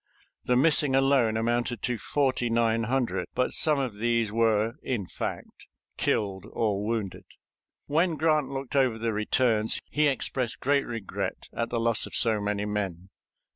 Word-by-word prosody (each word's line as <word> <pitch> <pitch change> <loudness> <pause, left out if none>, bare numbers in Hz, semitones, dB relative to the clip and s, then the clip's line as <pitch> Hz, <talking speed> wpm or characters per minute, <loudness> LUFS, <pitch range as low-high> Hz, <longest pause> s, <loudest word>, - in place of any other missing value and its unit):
The 125 - +2
missing 140 0 +4
alone 135 -5 +3
amounted 120 0 -1
to 125 -2 -1
forty 130 -1 0
nine 115 -1 +1
hundred, 115 -8 -1
but 125 - 0
some 155 -2 +4
of 130 -7 -3
these 115 -2 +1
were, 115 0 +2
in 115 -7 -3
fact, - - -7 0.3
killed 100 -1 -1
or 105 -3 0
wounded. 105 -4 -3 0.6
When 165 +3 +1
Grant 155 -2 +1
looked 135 0 -6
over 130 -5 +2
the 115 0 -2
returns, 110 +1 +1
he 150 0 +2
expressed 130 -3 -2
great 140 +1 +1
regret 115 -5 -5
at 115 - -2
the 120 - -1
loss 115 0 +2
of - - -7
so 110 -3 +4
many 105 0 -2
men. 100 -3 -4
115 Hz, 155 wpm, -27 LUFS, 110-135 Hz, 0.6 s, missing